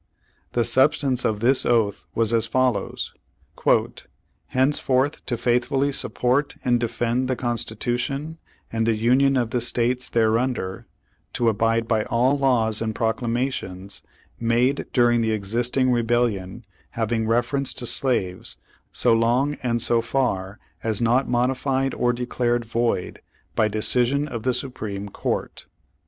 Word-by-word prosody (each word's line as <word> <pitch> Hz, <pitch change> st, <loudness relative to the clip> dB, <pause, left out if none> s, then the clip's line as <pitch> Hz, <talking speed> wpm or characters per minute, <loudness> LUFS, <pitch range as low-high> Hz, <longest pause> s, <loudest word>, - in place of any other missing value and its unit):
The 120 Hz, -, +2 dB
substance 130 Hz, +2 st, +2 dB
of 105 Hz, -1 st, 0 dB
this 130 Hz, +3 st, +4 dB
oath 110 Hz, -4 st, +1 dB
was 115 Hz, 0 st, +1 dB
as 115 Hz, -1 st, +2 dB
follows: 130 Hz, +2 st, -1 dB, 1.3 s
"Henceforth 130 Hz, +1 st, +1 dB
to 120 Hz, -, -1 dB
faithfully 125 Hz, +4 st, +1 dB
support 140 Hz, +2 st, 0 dB
and 120 Hz, -1 st, +3 dB
defend 120 Hz, +2 st, -1 dB
the 130 Hz, -, 0 dB
Constitution 120 Hz, +6 st, -3 dB, 0.3 s
and 115 Hz, 0 st, 0 dB
the 115 Hz, -, +3 dB
Union 130 Hz, +5 st, +3 dB
of 120 Hz, -3 st, 0 dB
the 125 Hz, -, 0 dB
States 125 Hz, +1 st, 0 dB
there 115 Hz, -1 st, +2 dB
under," 120 Hz, -7 st, -3 dB, 0.5 s
to 120 Hz, -2 st, +2 dB
abide 115 Hz, +1 st, +1 dB
by 110 Hz, -2 st, +1 dB
all 125 Hz, +4 st, +2 dB
laws 120 Hz, -6 st, +1 dB
and 110 Hz, -1 st, -2 dB
proclamations, 115 Hz, -4 st, -2 dB, 0.4 s
"made 120 Hz, +4 st, +1 dB
during 120 Hz, -2 st, +3 dB
the 110 Hz, -1 st, +1 dB
existing 120 Hz, +5 st, 0 dB
rebellion, 115 Hz, -3 st, 0 dB, 0.3 s
having 110 Hz, 0 st, 0 dB
reference 125 Hz, +4 st, +1 dB
to 120 Hz, -, -3 dB
slaves, 120 Hz, -7 st, -1 dB, 0.3 s
so 120 Hz, -, +3 dB
long 120 Hz, +6 st, +2 dB
and 120 Hz, -2 st, 0 dB
so 120 Hz, -1 st, +2 dB
far 115 Hz, -6 st, -1 dB, 0.3 s
as 110 Hz, -2 st, -1 dB
not 120 Hz, +3 st, +2 dB
mod 125 Hz, +1 st, +2 dB
ified 135 Hz, 0 st, -1 dB
or 120 Hz, -, +2 dB
declared 120 Hz, -1 st, -1 dB
void 115 Hz, -4 st, -1 dB, 0.3 s
by 110 Hz, -, +3 dB
decision 125 Hz, +7 st, +1 dB
of 120 Hz, -6 st, -5 dB
the 130 Hz, +2 st, +1 dB
Supreme 105 Hz, -6 st, -5 dB
Court." -, -, -4 dB
120 Hz, 135 wpm, -23 LUFS, 115-130 Hz, 1.3 s, this